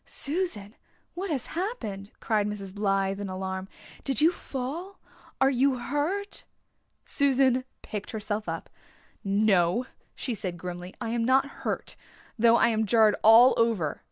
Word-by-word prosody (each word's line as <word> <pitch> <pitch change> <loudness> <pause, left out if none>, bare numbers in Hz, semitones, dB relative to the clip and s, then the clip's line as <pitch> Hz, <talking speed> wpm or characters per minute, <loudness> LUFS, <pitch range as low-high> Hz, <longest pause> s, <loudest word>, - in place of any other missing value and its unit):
"Susan, 280 - -1 0.4
what 375 +2 -4
has 275 -6 -2
happened?" 320 - -4
cried 210 -2 0
Mrs. 200 -2 -6
Blythe 195 -1 0
in 200 - -4
alarm. 190 0 -4 0.4
"Did 270 -5 -1
you 320 +3 +5
fall? 325 +7 -6 0.4
Are 270 0 +4
you 265 0 +2
hurt?" 300 - -2 0.6
Susan 265 -2 +2 0.2
picked 210 -1 -6
herself 215 -1 -3
up. - - -5 0.6
"No," 200 +1 +2 0.3
she 250 - -3
said 185 -5 -4
grimly, 180 +1 -7
"I 235 -3 -4
am 235 0 0
not 260 +3 +4 0.2
hurt, - - -3 0.4
though 230 0 +5
I 235 - +4
am 220 -1 0
jarred 220 0 +5
all 230 +4 +8
over. 225 -10 +1
230 Hz, 140 wpm, -27 LUFS, 200-270 Hz, 0.6 s, all